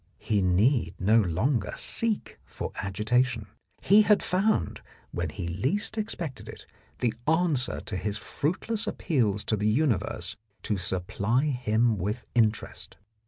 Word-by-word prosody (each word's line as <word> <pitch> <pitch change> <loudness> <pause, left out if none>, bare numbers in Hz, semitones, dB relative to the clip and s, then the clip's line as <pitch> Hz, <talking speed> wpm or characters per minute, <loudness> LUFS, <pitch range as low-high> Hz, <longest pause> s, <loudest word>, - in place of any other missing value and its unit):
He 105 -2 0
need 95 - +2
no 110 +5 +4
longer 105 - 0
seek 230 -2 +1
for - - -6
agitation. 110 +4 0 0.4
He 205 +3 +7
had 210 -1 +3
found, 185 - 0 0.3
when 85 -2 -2
he 85 +3 -5
least 130 - -1
expected 175 - -5
it, - - -11 0.4
the 120 -3 +1
answer 160 -6 +2
to 105 - -6
his 105 +2 -2
fruitless 210 - -2
appeals 115 - 0
to 110 - 0
the 105 0 -1
universe 120 -2 0 0.3
to 105 - 0
supply 100 - 0
him 120 -5 +1
with 105 +6 -3
interest. 110 -3 -1
115 Hz, 130 wpm, -27 LUFS, 100-150 Hz, 0.4 s, He